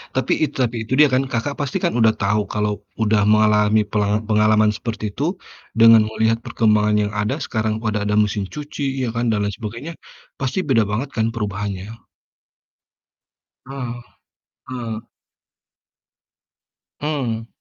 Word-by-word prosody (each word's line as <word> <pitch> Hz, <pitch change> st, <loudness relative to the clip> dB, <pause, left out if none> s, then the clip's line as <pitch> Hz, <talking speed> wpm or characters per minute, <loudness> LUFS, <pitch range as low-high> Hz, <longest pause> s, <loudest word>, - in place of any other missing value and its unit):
Tapi 130 Hz, -1 st, +1 dB
itu 155 Hz, -, -1 dB
tapi 120 Hz, 0 st, -1 dB
itu 120 Hz, -, -4 dB
dia 150 Hz, -, +8 dB
kan 130 Hz, +1 st, +3 dB
Kakak 125 Hz, +5 st, -1 dB
pasti 145 Hz, -3 st, -1 dB
kan -, -, +1 dB
udah 110 Hz, -1 st, +5 dB
tahu 105 Hz, +1 st, +2 dB
kalau 105 Hz, 0 st, -1 dB, 0.2 s
udah 110 Hz, -1 st, +3 dB
mengalami 105 Hz, 0 st, +4 dB
pelanga 105 Hz, 0 st, 0 dB
pengalaman 105 Hz, 0 st, +4 dB
seperti 110 Hz, -1 st, -4 dB
itu 165 Hz, +7 st, -1 dB, 0.4 s
dengan 115 Hz, -1 st, +8 dB
melihat 110 Hz, +1 st, +1 dB
perkembangan 105 Hz, -1 st, +2 dB
yang 105 Hz, -, -2 dB
ada, 105 Hz, 0 st, 0 dB
sekarang 110 Hz, -1 st, -1 dB
pada 110 Hz, -1 st, -1 dB
ada 105 Hz, 0 st, 0 dB
mesin 105 Hz, -1 st, +1 dB
cuci, 145 Hz, -3 st, -3 dB
ya 120 Hz, -, -2 dB
kan, 120 Hz, +1 st, 0 dB
dan 105 Hz, -2 st, +1 dB
lain 100 Hz, -, -2 dB
sebagainya, 115 Hz, +10 st, -6 dB, 0.5 s
pasti 135 Hz, +8 st, -1 dB
beda 125 Hz, -6 st, +3 dB
banget 120 Hz, +7 st, -2 dB
kan, 110 Hz, 0 st, 0 dB
perubahannya? 105 Hz, -2 st, -4 dB, 1.7 s
Heeh. 125 Hz, -3 st, -6 dB, 0.7 s
Heeh. 115 Hz, -4 st, -5 dB, 2.0 s
Mmm. 125 Hz, -7 st, -2 dB
110 Hz, 140 wpm, -21 LUFS, 105-125 Hz, 2.0 s, dia